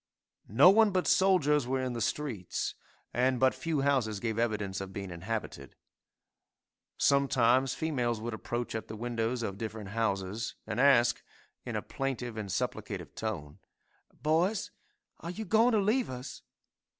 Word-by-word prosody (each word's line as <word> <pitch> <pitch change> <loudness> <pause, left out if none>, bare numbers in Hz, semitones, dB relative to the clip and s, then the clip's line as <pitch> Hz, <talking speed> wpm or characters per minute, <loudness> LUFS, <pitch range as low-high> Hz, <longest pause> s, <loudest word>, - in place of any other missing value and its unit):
No 135 - +7
one 220 +1 +5
but 185 -2 0
soldiers 150 -8 +3
were 130 +1 0
in 130 -1 -2
the 120 - -4
streets, 110 -6 -2 0.4
and 125 +1 +2
but 130 0 +4
few 160 -4 -2
houses 130 -7 +1
gave 115 0 -2
evidence 105 -5 -1
of 95 0 -6
being 100 -2 -5
inhabited. 100 +6 -5 1.2
Sometimes 130 -2 +3
females 125 -8 -1
would 115 +1 -4
approach 120 +2 -4
at 110 - -4
the 110 - -7
windows 115 +1 -2
of 100 -2 -4
different 110 -3 -5
houses 105 0 -2
and 110 - -3
ask, 125 -4 +5 0.5
in - - -3
a - - -2
plaintive 125 -4 -3
and 105 -3 -5
supplicative - - -3
tone, 90 -7 -5 0.6
"Boys, 175 +7 +1 0.5
are 170 - -6
you 215 +5 -5
going 225 +5 +4
to 215 - +4
leave 220 +6 +1
us?" 130 +1 -7
120 Hz, 150 wpm, -30 LUFS, 110-145 Hz, 1.2 s, No